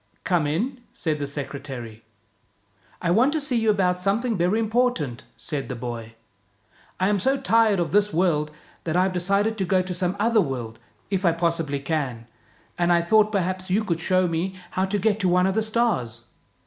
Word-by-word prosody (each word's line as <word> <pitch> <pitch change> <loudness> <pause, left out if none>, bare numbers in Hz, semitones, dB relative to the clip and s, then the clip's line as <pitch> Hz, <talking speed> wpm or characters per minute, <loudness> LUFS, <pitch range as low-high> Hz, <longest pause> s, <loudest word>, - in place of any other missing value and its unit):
" - - -41
Come 160 -4 +3
in," 240 - -2
said 155 -3 -1
the 145 - -2
secretary. 135 -6 -7 1.0
"I 170 - +2
want 250 - +4
to 315 - +1
see 280 -4 0
you 225 -1 +2
about 185 -3 +2
something 215 +5 0
very 185 +4 +1
impor 245 +3 +2
tant," 130 -6 -5
said 140 -6 -4
the 125 - -3
boy. 115 -2 -6 0.4
" - - -32
I 185 - +2
am 205 -1 +2
so 265 +8 +2
tired 220 -3 +3
of 170 - -1
this 205 +1 +3
world 160 -4 +1 0.4
that 165 -1 -1
I 180 - +4
have 190 0 0
decided 200 +5 +1
to - - +1
go 185 0 +2
to 185 0 -4
some 180 +1 -1
other 225 +1 +3
world, 120 - -4 0.3
if 195 -1 0
I 170 -3 +4
possibly 165 -4 -1
can, 135 -6 -3 0.5
and 175 0 +3
I 170 -1 +4
thought 215 +4 +4
perhaps 185 -2 -2
you 205 +4 +2
could 170 -6 -1
show 185 +2 +2
me 175 +3 -2 0.2
how 185 - 0
to 200 +2 -1
get 210 +1 +1
to 185 -4 +2
one 180 +1 +3
of 190 - +1
the 220 - +1
stars. 215 - 0
180 Hz, 205 wpm, -24 LUFS, 150-210 Hz, 1.0 s, want